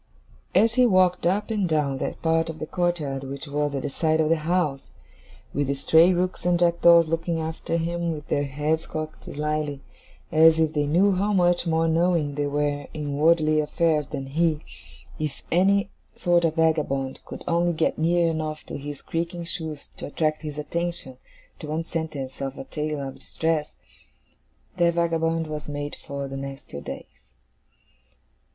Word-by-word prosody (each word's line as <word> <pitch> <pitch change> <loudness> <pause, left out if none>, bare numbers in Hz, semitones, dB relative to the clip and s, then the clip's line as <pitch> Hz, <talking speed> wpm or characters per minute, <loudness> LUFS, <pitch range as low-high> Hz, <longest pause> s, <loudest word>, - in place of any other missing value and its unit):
As 220 +4 +5
he 250 +1 +5
walked 185 -4 +3
up 205 +5 0
and 205 -5 0
down 145 -4 +1
that - - -4
part 165 0 +2
of 160 - -6
the 155 - -4
courtyard 155 -6 -1
which 140 +3 -6
was 145 0 -1
at 135 - -3
the 145 - -2
side 160 +2 +1
of 155 -1 +2
the 165 - +4
house, 155 -3 -1 0.6
with 145 -1 0
the 140 - 0
stray 160 +5 +5
rooks 180 +1 -1
and 175 0 +3
jackdaws 170 -1 +5
looking 165 +1 -1
after 160 +1 -2
him 170 +1 -1
with 150 -2 -6
their 145 0 0
heads 150 +4 -1
cocked 155 0 -6
slyly, 150 -1 -2 0.5
as 160 0 +6
if 160 -1 +2
they 145 -2 +1
knew 180 +7 +4
how 200 +3 +1
much 175 -2 +3
more 165 0 +2
knowing 165 -2 +2
they 145 0 -1
were 145 0 -1
in 145 -2 -3
worldly 155 0 +4
affairs 155 -1 +1
than 135 -2 -5
he, 155 +2 0 0.6
if 150 -3 -4
any 195 +3 +3 0.2
sort 175 -1 +2
of 160 -1 0
vagabond 150 -5 +1
could - - -9
only 170 +1 +2
get 160 0 0
near 170 +1 +3
enough 155 -1 -2
to - - -7
his 145 0 -7
creaking 170 +1 -3
shoes 160 -3 -6
to - - -6
attract 155 +1 -1
his 150 -2 -6
attention 170 -3 -3 0.4
to 155 - -7
one 155 +2 -2
sentence 155 -6 -5
of 135 0 -4
a - - -5
tale 150 -1 -3
of 135 - -9
distress, 160 -2 -1 1.1
that 170 -1 +3
vagabond 165 -1 +1
was 150 -1 -6
made 145 0 -4
for 140 -1 -6
the 135 0 -6
next 135 0 -8
two 70 - -6
days. - - -10
160 Hz, 175 wpm, -25 LUFS, 145-170 Hz, 1.1 s, as